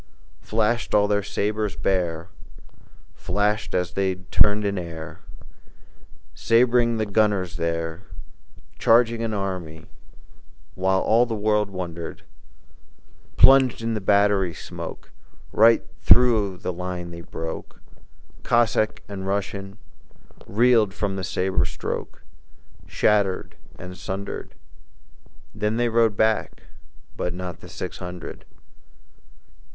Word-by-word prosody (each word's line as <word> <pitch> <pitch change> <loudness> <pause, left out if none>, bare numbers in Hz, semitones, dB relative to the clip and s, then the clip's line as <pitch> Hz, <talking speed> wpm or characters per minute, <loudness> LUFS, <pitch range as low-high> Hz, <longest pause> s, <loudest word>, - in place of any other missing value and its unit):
Flashed 115 +1 0
all 105 0 +4
their 105 0 +1
sabres 105 +1 -2
bare, 85 -4 -1 0.8
Flashed 105 +4 -1
as 90 -1 0
they 95 -1 0
turned 105 +3 +2
in 100 -2 -1
air, 80 -2 -8 1.1
Sab'ring 120 0 +3
the 110 - 0
gunners 100 -4 +1
there, 85 0 -2 0.8
Charging 115 0 +4
an 115 -1 -2
army, 90 -5 -4 0.9
while 95 0 +1
All 120 +2 +3
the 115 - -2
world 105 -1 +1
wondered: 85 -3 -6 1.1
Plunging 130 -4 +5
in - - 0
the 110 - -3
battery 100 -3 +2
smoke, - - -8 0.4
Right 115 +2 +5
through 110 -6 +4
the 90 - -4
line 90 -1 -5
they 85 0 -8
broke; 80 0 -7 0.6
Cossack 110 -2 +1
and 95 -2 -6
Russian 100 0 -3 0.7
Reeled 110 -2 +3
from 100 -2 -2
the 95 - -4
sabre 95 0 0
stroke - - -5 0.6
Shattered 100 -3 +1 0.2
and 90 0 -9
sundered. 95 +2 -6 1.0
Then 105 +1 -1
they 120 0 +1
rode 115 -2 +2
back, 110 0 0 0.5
but 90 -1 -3
not 90 0 -5
Not 90 - -7
the - - -12
six - - -6
hundred. 90 -1 -8
100 Hz, 110 wpm, -24 LUFS, 90-110 Hz, 1.1 s, Plunging